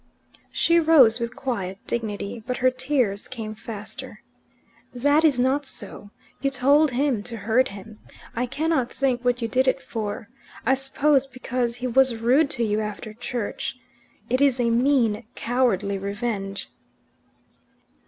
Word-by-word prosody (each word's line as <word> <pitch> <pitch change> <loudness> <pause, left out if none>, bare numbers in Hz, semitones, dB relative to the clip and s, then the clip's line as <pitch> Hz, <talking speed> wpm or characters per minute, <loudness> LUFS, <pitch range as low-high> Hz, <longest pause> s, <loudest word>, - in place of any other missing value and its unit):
She 335 0 +3
rose 280 -8 +6
with 235 +1 -4
quiet 195 -8 -3
dignity, 220 -1 -4
but 250 - -2
her 255 0 +3
tears 255 -6 0
came 225 -4 -6
faster. 215 -1 -8 0.7
"That 290 +5 +3
is 300 -5 +4
not 260 +3 +2
so. 205 -5 -8 0.3
You 275 - +2
told 280 +3 +4
him 255 -3 0
to 230 +2 -7
hurt 225 +5 +2
him. 205 +2 -11 0.4
I 245 +2 -1
cannot 290 -1 0
think 255 -3 0
what 245 -1 +1
you - - 0
did 260 +3 +1
it 260 - +2
for. 215 -4 -5 0.4
I 265 - +4
suppose 270 +1 +2
because 250 -2 -2
he 245 +1 -5
was 255 0 +3
rude 255 +7 +3
to 240 -5 -1
you 210 -1 +1
after 215 +1 -5
church. 240 -1 -4 0.5
It 255 +2 0
is 270 -3 +4
a 235 -1 +2
mean, 240 -3 +2
cowardly 215 -5 0
revenge. 200 -1 -4
245 Hz, 145 wpm, -24 LUFS, 220-265 Hz, 0.7 s, rose